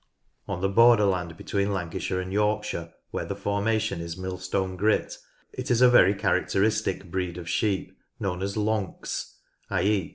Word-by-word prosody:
On 95 -2 -3
the 95 - +2
borderland 100 -6 +4
between 100 +3 -1
Lancashire 90 0 -2
and 95 +1 -4
York 105 +1 +2
shire, 85 -5 -5 0.2
where - - -2
the - - -4
formation 105 -2 0
is 85 0 -6
Millstone 95 0 -3
Grit, 110 - +1 0.4
is 125 - 0
a 125 0 +7
very 100 -5 +6
characteristic 100 -2 0
breed 90 -2 -2
of 85 -2 -7
sheep 100 +2 -1 0.2
known 90 -2 -2
as 100 +1 -2
"Lonks" 105 -3 -2 0.3
(i.e. 95 -1 +1
95 Hz, 150 wpm, -26 LUFS, 90-105 Hz, 0.4 s, a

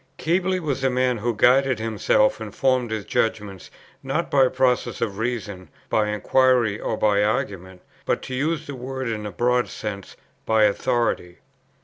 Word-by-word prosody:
Keble 185 +3 0
was 140 -4 -3
a 135 - +3
man 125 -2 0
who 120 +1 -1
guided 130 +3 +4
himself 115 - +1
and - - -8
formed 130 -3 +1
his 110 -2 -4
judgments, 105 -4 -2 0.3
not 135 +6 -2
by 135 -2 +5
processes 130 -1 0
of 100 -3 -3
reason, 110 -6 -4 0.2
by 105 -1 +1
inquiry 120 0 +2
or - - -3
by 105 -1 +2
argument, 95 -3 -3 0.2
but, - - -1
to 130 - -7
use 155 +4 -1
the 145 - -7
word 130 0 -5
in 105 -2 -3
a - - -6
broad 125 +4 +1
sense, 100 -2 -7 0.3
by 110 -1 +3
authority. 105 -4 0
120 Hz, 160 wpm, -23 LUFS, 105-130 Hz, 0.3 s, by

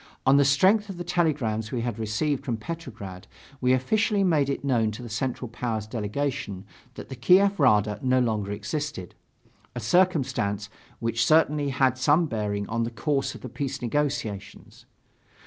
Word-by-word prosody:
On 135 +1 +6
the 140 - +6
strength 190 +10 +3
of 190 - -6
the 175 - -4
telegrams 140 -11 0
we 125 - -2
had 120 -2 -3
received 130 +6 -1
from 120 -5 -2
Petrograd, 110 - -8 0.3
we 125 0 +3
officially 205 - +2
made 155 -7 +2
it 140 - -3
known 120 -5 +2
to 110 +3 -7
the 120 - -7
Central 125 +3 -3
Powers' 115 -2 -3
delegation 110 -2 -3 0.3
that - - -9
the 130 - -6
Kiev 190 +10 +4
Rada 105 -6 +3
no 130 -1 +2
longer 110 -5 0
existed, 140 - -4 0.6
a - - -3
circumstance 130 - +1 0.3
which 115 +1 0
certainly 150 -1 +3
had 130 -2 +1
some 150 +6 +4
bearing 105 -6 -2
on 115 +2 -1
the 115 - -1
course 135 +4 -1
of - - -11
the - - -6
peace 135 -2 -4
negotiations. 115 -6 -3
130 Hz, 165 wpm, -26 LUFS, 110-150 Hz, 0.6 s, On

